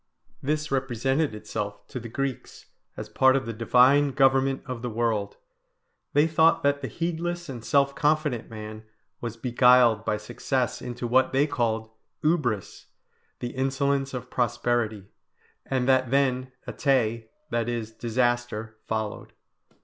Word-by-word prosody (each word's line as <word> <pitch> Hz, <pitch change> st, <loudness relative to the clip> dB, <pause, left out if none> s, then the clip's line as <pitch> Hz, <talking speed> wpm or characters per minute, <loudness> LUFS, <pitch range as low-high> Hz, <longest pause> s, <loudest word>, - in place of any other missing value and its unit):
This 150 Hz, +2 st, -2 dB
represented 135 Hz, +1 st, 0 dB
itself 105 Hz, -1 st, -5 dB
to 125 Hz, -, -5 dB
the 115 Hz, 0 st, -8 dB
Greeks 135 Hz, +1 st, -4 dB, 0.3 s
as -, -, -6 dB
part 130 Hz, 0 st, +4 dB
of 135 Hz, -, 0 dB
the 115 Hz, -, -4 dB
divine 130 Hz, +5 st, +4 dB
government 135 Hz, 0 st, +3 dB
of 125 Hz, -3 st, -5 dB
the 125 Hz, -, -3 dB
world; 110 Hz, -3 st, -1 dB, 0.8 s
they 145 Hz, +1 st, +5 dB
thought 160 Hz, 0 st, +3 dB
that 140 Hz, 0 st, +2 dB
the 130 Hz, -, -3 dB
heedless 175 Hz, +2 st, -3 dB
and 125 Hz, -5 st, -7 dB
self 140 Hz, +2 st, +2 dB
confident 150 Hz, -5 st, 0 dB
man 110 Hz, -1 st, -8 dB, 0.4 s
was 115 Hz, -1 st, -5 dB
beguiled 125 Hz, -1 st, +4 dB
by 105 Hz, -, 0 dB
success 120 Hz, +3 st, -2 dB
into 125 Hz, 0 st, -5 dB
what 130 Hz, +3 st, +3 dB
they 135 Hz, +2 st, +4 dB
called 115 Hz, -6 st, -1 dB, 0.3 s
ubris, 145 Hz, -, -1 dB, 0.6 s
the 120 Hz, -, -2 dB
insolence 135 Hz, +1 st, 0 dB
of 125 Hz, 0 st, -7 dB
prosperity; 120 Hz, -4 st, 0 dB, 0.6 s
and 130 Hz, -2 st, 0 dB
that 130 Hz, -2 st, +3 dB
then 130 Hz, -1 st, +1 dB, 0.2 s
atae, 115 Hz, -5 st, 0 dB, 0.2 s
that 120 Hz, 0 st, 0 dB
is, 115 Hz, -2 st, -3 dB
disaster, 120 Hz, -1 st, -1 dB
followed. 110 Hz, -1 st, -4 dB
125 Hz, 135 wpm, -26 LUFS, 115-135 Hz, 0.8 s, they